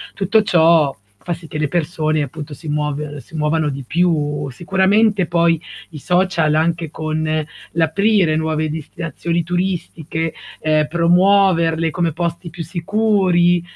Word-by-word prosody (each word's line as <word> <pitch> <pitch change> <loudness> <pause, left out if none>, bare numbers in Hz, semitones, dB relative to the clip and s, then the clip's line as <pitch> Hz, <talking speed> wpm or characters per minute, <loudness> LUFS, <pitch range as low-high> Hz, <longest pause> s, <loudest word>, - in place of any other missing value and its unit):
tutto 200 +3 +2
ciò 165 -6 +3 0.2
fa 175 - -3
sì 165 0 -10
che - - -5
le 150 -1 0
persone 155 -1 -1
appunto 150 +2 -7
si 150 +3 -9
muove 150 0 -3
si 160 - -14
muovano 155 0 0
di 135 -1 -5
più. 150 -2 0
Sicuramente 195 - +2
poi 170 -2 +2 0.3
i 155 - -9
social 175 -2 +1
anche 165 +1 0
con 155 0 -2 0.3
l'aprire 170 +2 +2
nuove 155 0 -1
destinazioni 165 +2 -3
turistiche, 170 -2 -3 0.3
ehm, 155 -1 +2
promuoverle 170 -1 +3
come 170 -1 -1
posti 170 +1 -3
più 165 +1 -7
sicuri, 175 0 +2
165 Hz, 130 wpm, -19 LUFS, 155-175 Hz, 0.3 s, ciò